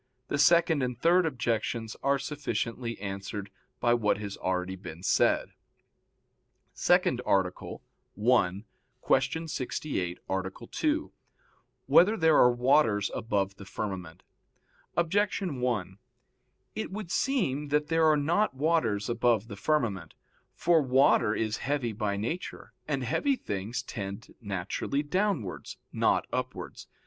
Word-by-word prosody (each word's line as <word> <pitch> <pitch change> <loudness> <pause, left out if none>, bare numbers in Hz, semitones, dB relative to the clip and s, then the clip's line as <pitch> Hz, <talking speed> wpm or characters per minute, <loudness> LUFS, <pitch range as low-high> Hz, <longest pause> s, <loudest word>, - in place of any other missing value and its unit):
The - - -1
second 170 0 +5
and 125 -2 -2
third 175 +3 +4
objections 115 -4 -2
are 140 0 +2
sufficiently 120 -5 -3
answered 100 0 -5 0.3
by 120 - +3
what 110 -5 +2
has 100 -1 -5
been - - -19
already 95 0 -1 0.3
said. - - +2
_______________________ - - -31 1.2
SECOND - - +2
ARTICLE 95 -2 -1 0.4
[I, 105 -4 +2 0.5
Q. 160 +5 -2
68, 125 - -3
Art. 95 0 -2 0.2
2] 310 0 0 0.7
Whether 210 +6 +5
There 160 -2 +4
Are 125 - +6
Waters 120 -5 +2
Above 100 -3 -1
the 100 - -10
Firmament? 95 -5 -6 0.7
Objection 180 -3 0
1: 100 -6 -2 0.7
It - - -4
would 195 -3 -6
seem 150 - 0
that 150 +1 0
there 165 -1 +3
are 155 -1 +5
not 170 +6 +1
waters 130 -9 +1
above 120 -2 +1
the 100 - -6
firmament. 100 - -1 0.4
For 170 -2 +3
water 130 -5 +3
is 110 -1 -1
heavy 135 -3 -1
by 100 -1 -2
nature, 120 - -5
and 140 -3 -1
heavy 275 - +1
things 110 - -4
tend 100 -3 -7
naturally 100 +8 -2
downwards, 180 - -2 0.2
not - - +2
upwards. - - -5
120 Hz, 125 wpm, -29 LUFS, 100-155 Hz, 1.2 s, Are